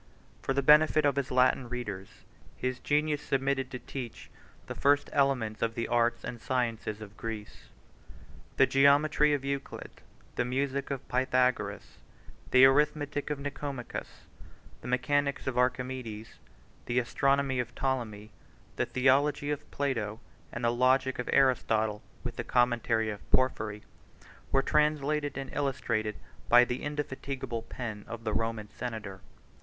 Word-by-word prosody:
For 135 - -1
the 140 0 0
benefit 150 +1 +6
of 140 -2 +3
his 140 -2 -1
Latin 125 -1 +3
readers, 105 -6 -5 0.5
his 130 -1 -2
genius 150 0 +1
submitted 135 -1 0
to 130 - -5
teach 125 -2 -8 0.3
the - - -5
first 145 +1 +2
elements 130 -6 +1
of 115 0 0
the 115 - -2
arts 120 0 +1
and 120 -2 -6
sciences 115 -4 -2
of 105 -1 -10
Greece. 110 -2 -7 0.9
The - - +7
geometry 145 +2 +4
of 135 -1 -5
Euclid, 140 0 -5 0.4
the - - +2
music 135 +2 -1
of 140 -2 -5
Pythagoras, 130 0 0 0.5
the 130 +1 +8
arithmetic 145 +1 +2
of 150 - -1
Nicomachus, 140 -2 -6 0.6
the - - -8
mechanics 140 +3 0
of 130 - -2
Archimedes, 125 -3 -2 0.5
the 120 - -1
astronomy 135 +2 +1
of 125 0 -3
Ptolemy, 115 -6 -2 0.5
the - - 0
theology 140 +3 +2
of 150 0 -5
Plato, 115 -7 -2 0.3
and 120 - -6
the 115 - +3
logic 130 +1 +2
of 125 - -3
Aristotle, 110 -5 +2 0.2
with - - -5
the - - -2
commentary 120 -2 +1
of 105 - -10
Porphyry, 110 -5 +1 0.7
were 135 - +3
translated 150 -1 +1
and 135 - -6
illustrated 115 -7 -1 0.3
by 120 +1 +8
the 125 +1 -3
indefatigable 135 -4 -4
pen 110 -3 -6
of 115 -1 -7
the 110 - -2
Roman 115 0 -2
senator. 110 -5 -6
130 Hz, 140 wpm, -30 LUFS, 115-140 Hz, 0.9 s, the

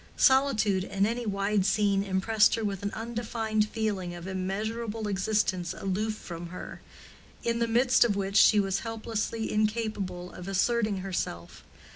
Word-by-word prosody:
Solitude 235 -8 +3
in 195 0 0
any 235 +1 -2
wide 200 0 +1
scene 200 0 +2
impressed 205 +3 +3
her 225 - -3
with 195 -2 -3
an 200 - -1
undefined 225 -2 -1
feeling 200 -6 -2
of 175 0 -9
immeasurable 210 +4 -3
existence 190 -3 0
aloof 210 +3 -1
from 170 -4 -8
her, 180 +2 -8 0.6
in 235 0 0
the 235 - +1
midst 245 +3 +4
of 225 -4 +1
which 195 0 -2
she 210 0 +7
was 195 -1 0
helplessly 225 0 -3
incapable 210 -5 -1
of 180 - -9
asserting 210 +2 +1
herself. 85 - -4
210 Hz, 145 wpm, -28 LUFS, 190-225 Hz, 0.6 s, she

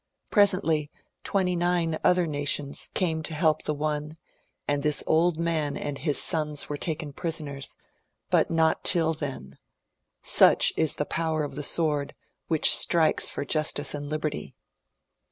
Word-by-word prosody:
Presently 175 -8 +2 0.3
twenty 185 -2 -1
nine 175 -2 -1
other 180 -1 +3
nations 145 -2 -1
came 160 -4 0
to 160 0 -4
help 155 -1 +1
the 150 - -2
one, 150 +1 -4 0.5
and 145 0 0
this 150 0 +1
old 165 +1 +1
man 155 -4 -2
and 145 -1 -5
his 145 0 0
sons 150 -2 0
were 145 - -4
taken 155 -1 -4
prisoners.^ 145 -4 -5 0.6
but - - +2
not 160 -1 +1
till 165 -3 +2
then; 135 - -8 0.6
such - - +6
is 160 -2 +1
the 150 - -3
power 160 -1 -2
of 145 - -6
the 145 - -5
sword 150 -1 0 0.3
which 160 -2 +5
strike's 165 -3 +3
for - - -5
Justice 150 -1 +2
and 145 -1 -6
Liberty. 155 -1 -4
155 Hz, 145 wpm, -25 LUFS, 145-165 Hz, 0.6 s, such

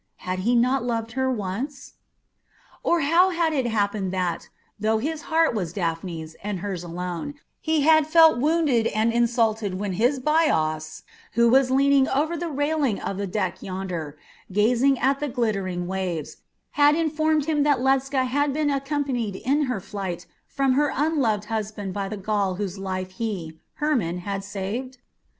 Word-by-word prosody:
Had 185 0 -2
he 235 +6 +2
not 250 +2 +2
loved 230 -2 -2
her 260 +2 0
once? 250 +5 -4 0.9
Or 340 -1 +2
how 335 +6 +4
had 335 -3 0
it 265 -5 0
happened 205 -4 0
that, 180 -3 -2 0.3
though 220 +1 +2
his 305 +7 -3
heart 325 -2 +3
was 180 -7 -3
Daphne's, 165 -3 -4
and 200 -3 -4
hers 190 -4 -4
alone, 175 - -5 0.2
he 315 -1 +1
had 315 0 +5
felt 320 -4 +6
wounded 290 -6 +2
and 220 +2 +1
insulted 225 -4 +1
when 195 0 -3
his 245 +9 +2
Bias, 160 - +1 0.3
who 235 +1 +4
was 260 +1 +4
leaning 275 +1 +4
over 305 +5 0
the 340 +1 -3
railing 290 -5 0
of 195 - -4
the 200 0 -2
deck 205 +3 -2
yonder, 180 -6 -5 0.3
gazing 245 +7 +3
at 275 +2 +1
the 295 - -2
glittering 195 -7 -1
waves, 180 -4 -3 0.3
had 290 0 +4
informed 310 -2 +1
him 305 -2 +1
that 285 -2 +3
Ledscha 265 0 +1
had 285 +3 +1
been 300 0 +1
accompanied 275 -6 -2
in 280 +8 +1
her 250 -6 -2
flight 185 -3 -5 0.2
from 270 -1 +1
her 290 +1 +2
unloved 265 -9 +1
husband 210 -3 -4
by 195 0 -3
the 215 - -5
Gaul 200 -1 -1
whose 195 0 -4
life 185 -1 -4
he, 185 -6 -5 0.2
Hermon, 245 - 0
had 195 +2 -4
saved? 210 +7 -5
235 Hz, 160 wpm, -24 LUFS, 195-285 Hz, 0.9 s, felt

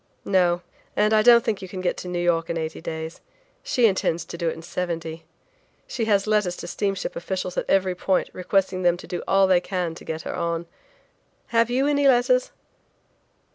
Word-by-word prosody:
"No, 180 -2 +2 0.3
and 210 +1 +3
I 215 - +5
don't 235 +1 +7
think 210 -3 -1
you 190 - -6
can 185 +1 -7
get 185 -1 0
to - - -7
New 180 0 -3
York 170 -1 +1
in 170 - -1
eighty 160 -1 -4
days. 160 0 -6 0.4
She 245 - +2
intends 175 -5 +1
to - - -8
do 170 -1 -1
it - - -4
in 165 - -11
seventy. 165 -2 -4 0.6
She 230 - -3
has 200 -2 +2
letters 210 -4 +1
to - - -7
steamship 195 -2 -2
officials 185 0 -4
at - - -3
every 190 -1 +3
point 185 +1 0
requesting 185 0 0
them 175 -1 +3
to - - -11
do 175 - -4
all 195 0 +4
they 185 -2 +4
can 180 -3 -2
to - - -12
get 160 0 -5
her - - -4
on. 170 0 -2 0.8
Have 230 0 +3
you 260 +3 +1
any 285 -1 +3
letters?" 250 0 +3
185 Hz, 200 wpm, -24 LUFS, 170-210 Hz, 0.8 s, don't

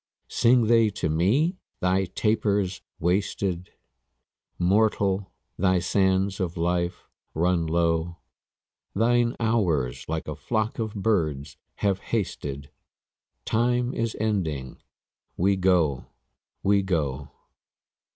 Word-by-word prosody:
Sing 120 0 +4
they 115 -1 +4
to 95 -5 -3
me? 125 - +2 0.2
'Thy 95 +1 +2
taper's 100 -1 0 0.2
wasted; 90 0 -1 0.9
Mortal, 100 0 +1 0.3
thy 95 0 +3
sands 95 +2 +1
of 90 -3 -2
life 85 +1 -1 0.3
run 85 0 +1
low; 85 +1 0 0.8
Thine 120 +2 +2
hours 90 - 0
like 80 0 -3
a 75 - -4
flock 110 - -2
of 110 -2 -3
birds 80 - -1 0.3
have 100 -1 +2
hasted: 70 -10 -4 0.7
Time 120 +2 +1
is 115 -1 -2
ending; 80 -12 -2 0.6
we 100 +3 +3
go, 90 -8 +2 0.6
we 100 0 +4
go.' 75 -7 -2
95 Hz, 100 wpm, -25 LUFS, 85-110 Hz, 0.9 s, Sing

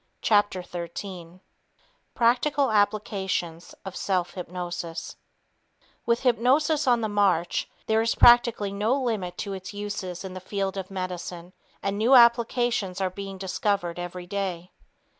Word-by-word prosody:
Chapter 205 -4 +2
13 175 0 -7 0.7
Practical 255 +3 +2
Applications 195 -5 -1
of 190 - -7
Self 185 -3 -1
Hypnosis 175 -2 -6 0.9
With 235 0 +2
hypnosis 270 +5 +2
on 240 -2 +4
the 220 - 0
march, 195 -5 +1 0.2
there 220 0 +2
is 225 0 0
practically 235 -4 +5
no 220 +7 +1
limit 210 -9 -2
to 200 - -4
its 190 +1 -8
uses 200 -3 -5
in 185 - -6
the 185 - -6
field 195 +1 -3
of 190 -1 -5
medicine, 180 -2 -6 0.3
and 200 +1 -1
new 240 +5 +5
applications 235 -5 +3
are 190 -1 0
being 195 0 -7
discovered 190 -2 -1
every 175 0 -6
day. 185 -2 -4
195 Hz, 130 wpm, -26 LUFS, 180-225 Hz, 0.9 s, practically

